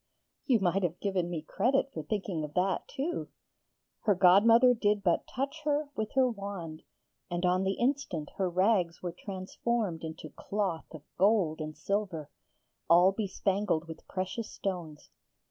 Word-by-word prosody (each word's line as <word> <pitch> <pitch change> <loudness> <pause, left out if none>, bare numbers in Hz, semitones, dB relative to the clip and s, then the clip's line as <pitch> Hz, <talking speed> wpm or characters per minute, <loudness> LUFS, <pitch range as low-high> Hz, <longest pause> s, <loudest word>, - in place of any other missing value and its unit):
'You 250 -5 +4
might 190 0 +1
have 175 -1 -1
given 190 -4 -1
me 165 -3 -4
credit 265 +10 +1
for - - -4
thinking 195 -7 -3
of 150 -1 -7
that 185 0 +1
too!' 295 +5 -3 0.7
Her 205 -3 +2
godmother 225 +7 +6
did 210 -3 +1
but 175 -3 +1
touch 280 +4 -3
her 295 0 0
with 215 -1 -3
her 260 -1 +4
wand, 195 -8 -6 0.5
and 175 0 -1
on 180 +1 +2
the 195 0 +1
instant 240 - -1
her 190 -2 +1
rags 185 -2 +1
were 175 - -2
transformed 195 -1 -3
into 160 -1 -7
cloth 195 -5 -2
of 155 -3 -10 0.2
gold 190 -6 +3
and 155 0 -6
silver, 190 -7 -2 0.6
all 175 +3 +7
bespangled 195 -4 -1
with 160 0 -10
precious 190 +4 -3
stones. 170 -6 -5
190 Hz, 150 wpm, -30 LUFS, 170-220 Hz, 0.7 s, all